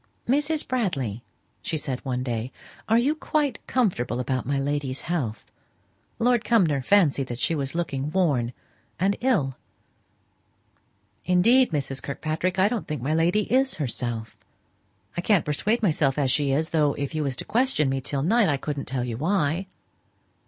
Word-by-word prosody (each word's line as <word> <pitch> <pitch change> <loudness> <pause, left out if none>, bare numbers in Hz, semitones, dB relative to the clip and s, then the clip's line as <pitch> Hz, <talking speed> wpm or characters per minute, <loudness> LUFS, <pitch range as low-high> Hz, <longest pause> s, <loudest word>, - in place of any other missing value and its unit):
"Mrs. 295 +4 +1
Bradley," 135 - -1 0.4
she 160 - -2
said 135 -4 -3
one 125 -2 -2
day, 120 0 -3 0.4
"are 225 - +5
you 265 +6 +3
quite 305 -2 -1
comfortable 175 - 0
about 130 -1 -2
my 140 0 0
lady's 140 -1 -2
health? 140 -11 -3 0.7
Lord 240 0 +2
Cumnor 170 - +3
fancied 145 -4 +3
that 120 - -5
she 165 - 0
was 140 -1 -3
looking 145 -5 -2
worn 145 -11 +1 0.5
and 195 +3 +2
ill?" 190 - +1 1.7
"Indeed, 230 +9 +4
Mrs. 135 -4 -2
Kirkpatrick, 160 +6 -2
I 190 +1 +5
don't 230 -1 -3
think 150 -6 -4
my 150 +4 0
lady 175 +6 +2
is 265 +1 +3
herself. 120 -5 -4 0.8
I 175 - -1
can't 195 -2 +2
persuade 215 +10 0
myself 150 -7 +2
as 135 -3 +2
she 145 -1 +2
is, 155 +4 0
though 150 -3 +2
if 140 +1 -4
you 155 - -1
was 140 -3 -1
to - - -6
question 240 - +2
me 135 0 -1
till 135 +1 -2
night 215 +3 +3
I 145 - +1
couldn't 145 0 -4
tell 130 -2 -2
you 120 -2 -4
why." 170 - 0
150 Hz, 160 wpm, -25 LUFS, 135-200 Hz, 1.7 s, are